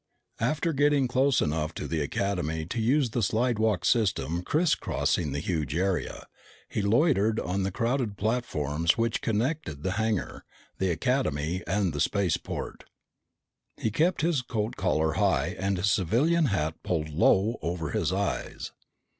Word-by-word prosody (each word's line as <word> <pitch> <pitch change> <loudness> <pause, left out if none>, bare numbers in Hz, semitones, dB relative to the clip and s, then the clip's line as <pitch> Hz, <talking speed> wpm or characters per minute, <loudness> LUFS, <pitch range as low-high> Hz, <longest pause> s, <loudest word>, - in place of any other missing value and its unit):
After 155 +7 0
getting 145 -1 +3
close 130 +2 +2
enough 80 +1 -1
to - - -4
the 80 -2 -1
Academy 80 0 -2
to 115 +7 -3
use 130 +2 +2
the 120 - -1
slidewalk 110 -3 +1
system 90 - +1
crisscrossing 115 - 0
the 70 - -2
huge 80 -4 -2
area, 95 +1 -1 0.4
he - - -2
loitered 110 0 +3
on 95 +2 -2
the 95 - 0
crowded 115 +1 -1
platforms 85 - 0
which 115 0 0
connected 110 - -2
the 95 - 0
hangar, 110 -4 -2 0.4
the 95 - +1
Academy, 85 - 0
and 95 -2 0
the 75 - -2
spaceport. 95 0 -2 0.9
He 110 - -1
kept 165 - +1
his 160 -4 +1
coat 110 -2 -3
collar 80 -5 +1
high 75 +7 +1
and 95 0 0
his 100 +2 +2
civilian 140 - +2
hat 80 - -1
pulled 80 -3 -2
low 95 +8 +2
over 85 -2 -3
his 85 0 0
eyes. 100 +1 -3
100 Hz, 145 wpm, -27 LUFS, 85-120 Hz, 0.9 s, getting